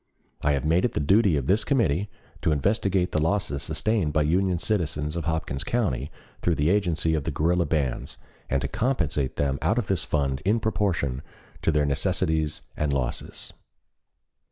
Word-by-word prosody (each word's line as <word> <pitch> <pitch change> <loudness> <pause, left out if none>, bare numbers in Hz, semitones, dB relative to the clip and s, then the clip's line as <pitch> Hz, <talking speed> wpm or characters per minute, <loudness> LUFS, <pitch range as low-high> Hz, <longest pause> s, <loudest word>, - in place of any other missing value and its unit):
I 75 - +2
have 70 +1 -1
made 85 +4 +3
it 125 - +1
the - - 0
duty 95 +3 +4
of 70 - -2
this 100 +9 +2
committee 100 - +1 0.3
to - - +2
investigate 95 - +1
the 80 - +1
losses 80 -5 0
sustained 100 -3 0
by 75 - +3
Union 90 +4 +2
citizens 80 -5 -1
of 85 -3 -3
Hopkins 80 -4 -2
County 75 - -1 0.3
through 85 - +2
the 75 +3 +2
agency 85 -5 +1
of 75 -3 0
the - - -2
guerrilla 85 +2 +1
bands, 70 -6 -1 0.3
and 70 -1 +1
to - - 0
compensate 80 - -1
them 70 -1 0
out 110 - +1
of 120 - +1
this 95 -4 0
fund 70 -3 -1
in 105 +5 +2
proportion 90 - 0 0.4
to - - +2
their 75 -1 +2
necessities 80 0 0
and 75 -1 0
losses." 65 -3 -2
80 Hz, 175 wpm, -26 LUFS, 75-95 Hz, 0.4 s, duty